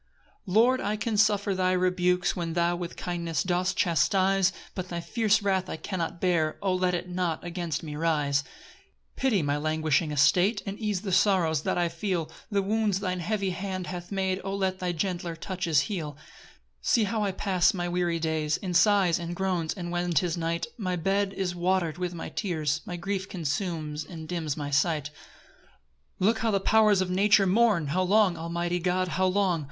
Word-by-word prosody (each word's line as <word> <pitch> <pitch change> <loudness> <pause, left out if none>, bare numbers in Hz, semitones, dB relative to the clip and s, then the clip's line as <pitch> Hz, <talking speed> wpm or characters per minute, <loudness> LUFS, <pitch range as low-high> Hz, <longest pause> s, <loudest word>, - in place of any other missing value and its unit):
1 185 -1 -4
Lord, 250 +4 +5
I 205 +2 -1
can 225 0 -2
suffer 205 -1 +3
thy 185 -1 +1
rebukes, 180 -1 +1
When 170 -2 -3
thou 170 0 +1
with 175 -1 -6
kindness 170 -4 -2
dost 180 +1 0
chastise 190 +4 +3 0.2
But 185 -1 -5
thy 170 - -3
fierce 220 +3 +1
wrath 190 -2 0
I - - -4
cannot 170 -1 -4
bear, 165 -4 +1
O 190 -2 0
let 180 -1 +1
it 175 +1 -4
not 180 -3 -2
against 170 -3 -3
me 150 -2 -6
rise! 150 -3 +1
2 140 - -19 0.7
Pity 245 -8 +1
my 145 0 0
languishing 155 +1 +1
estate, 180 - +3
And 200 0 -5
ease 210 -4 -1
the 200 -2 -4
sorrows 175 -6 +3
that - - -1
I 175 -1 +2
feel; 170 -2 -3 0.2
The 200 -2 +1
wounds 210 -1 +1
thine 185 -2 -2
heavy 195 +1 -1
hand 185 0 -4
hath 175 0 -7
made, 190 -1 -1
O 195 0 -3
let 190 -1 -1
thy 180 -2 -1
gentler 175 -1 -3
touches 170 -3 0
heal. 160 -6 -4
3 145 - -21 0.6
See 225 - +3
how 210 +1 -1
I 200 - 0
pass 185 -2 +2
my 175 -4 -3
weary 175 -1 0
days 160 -2 0
In 185 -2 -4
sighs 190 -2 +4
and 170 0 -5
groans; 180 -4 -1
and 175 -3 -5
when 175 0 -1
'tis 165 +2 +1
night 170 0 -2
My 185 -3 -1
bed 195 +3 0
is 190 -2 -2
water'd 175 -2 0
with 180 -1 -3
my 165 - -6
tears; 155 -6 -1
My 175 - -4
grief 195 +1 -3
consumes 155 -2 -3
and 160 0 -9
dims 160 -4 -3
my 145 -1 -4
sight. 150 0 +1 1.1
4 185 - +2
Look 225 -1 0
how 230 - +1
the 200 -2 +2
powers 210 -1 +4
of 185 -1 -1
nature 200 +2 +4
mourn! 200 -3 +3
How 180 +6 +1
long, 195 0 +3
almighty 170 +1 -2
God, 180 +1 0
how 185 +3 +1
long? 185 -2 +1
180 Hz, 195 wpm, -27 LUFS, 165-195 Hz, 1.1 s, Lord